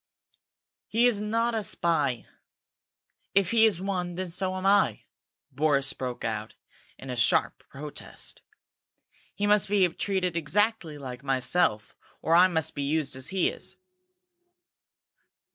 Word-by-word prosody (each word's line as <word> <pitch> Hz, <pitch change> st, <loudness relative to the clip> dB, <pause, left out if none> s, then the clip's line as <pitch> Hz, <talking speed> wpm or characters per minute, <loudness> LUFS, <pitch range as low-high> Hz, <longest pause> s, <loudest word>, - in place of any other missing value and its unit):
"He 230 Hz, +3 st, +2 dB
is 230 Hz, -4 st, +2 dB
not 230 Hz, +3 st, 0 dB
a 220 Hz, -, 0 dB
spy! 150 Hz, -, 0 dB, 1.1 s
If 195 Hz, -2 st, +3 dB
he 225 Hz, -1 st, +6 dB
is 200 Hz, -6 st, 0 dB
one, 180 Hz, -2 st, -3 dB
then 185 Hz, -1 st, -4 dB
so 185 Hz, +1 st, -2 dB
am 185 Hz, 0 st, -4 dB
I!" 200 Hz, 0 st, +3 dB, 0.5 s
Boris 140 Hz, -1 st, +2 dB
broke 125 Hz, -2 st, -5 dB
out 110 Hz, -1 st, -4 dB, 0.4 s
in 135 Hz, -, -8 dB
a -, -, -3 dB
sharp 120 Hz, -, +1 dB
protest. 145 Hz, +2 st, -7 dB, 0.9 s
"He 205 Hz, -, -1 dB
must 205 Hz, -1 st, +3 dB
be 200 Hz, -3 st, +4 dB
treated 185 Hz, 0 st, -1 dB
exactly 170 Hz, 0 st, 0 dB
like 130 Hz, -2 st, -8 dB
myself, 130 Hz, -3 st, 0 dB, 0.3 s
or 160 Hz, -, 0 dB
I 180 Hz, +2 st, +7 dB
must 160 Hz, -5 st, -1 dB
be 145 Hz, -, -4 dB
used 140 Hz, -1 st, -1 dB
as 130 Hz, +1 st, -4 dB
he 190 Hz, -, +1 dB
is!" 485 Hz, +2 st, -7 dB
175 Hz, 135 wpm, -27 LUFS, 140-200 Hz, 1.1 s, I